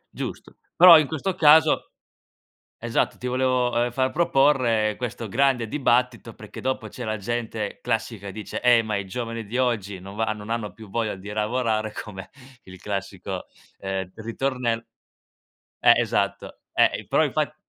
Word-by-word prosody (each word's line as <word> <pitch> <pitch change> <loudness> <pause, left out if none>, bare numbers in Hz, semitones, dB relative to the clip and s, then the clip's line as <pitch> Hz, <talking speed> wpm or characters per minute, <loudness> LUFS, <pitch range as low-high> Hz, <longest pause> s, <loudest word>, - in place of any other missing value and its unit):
Giusto. - - -7 0.2
Però 170 -2 +10
in 150 - 0
questo 160 +4 -2
caso 155 0 +4 0.9
esatto, 120 -1 -1
ti 125 - -6
volevo, 125 -1 +1
ehm, 120 - -2
far 130 +2 0
proporre, 135 -9 +2
ehm, - - -13
questo 120 -2 -5
grande 125 +1 +1
dibattito 125 -3 0
perché - - -11
dopo 130 0 -2
c'è 125 - -8
la 110 -1 -2
gente 110 0 -4
classica 110 -2 -3
e - - -7
dice: 105 +2 -6
"Eh 120 -2 +6
ma 110 -2 -2
i 100 - -3
giovani 115 +2 -5
di 120 +5 -4
oggi 105 -7 -1
non 95 +2 -10
va 110 -1 0
non 105 0 -9
hanno 115 -4 -3
più 110 0 -13
voglia 110 -1 -2
di 95 +2 -11
lavorare" 110 0 -1
come 95 -4 -8 0.3
il 95 -1 -13
classico, 100 -1 -5 0.4
ehm, 95 -1 -4
ritornell 115 0 -2 1.0
eh - - +7
esatto, - - -1 0.2
eh - - +5
i - - -10
però - - +3
infatt - - -1
115 Hz, 165 wpm, -24 LUFS, 105-125 Hz, 1.0 s, Però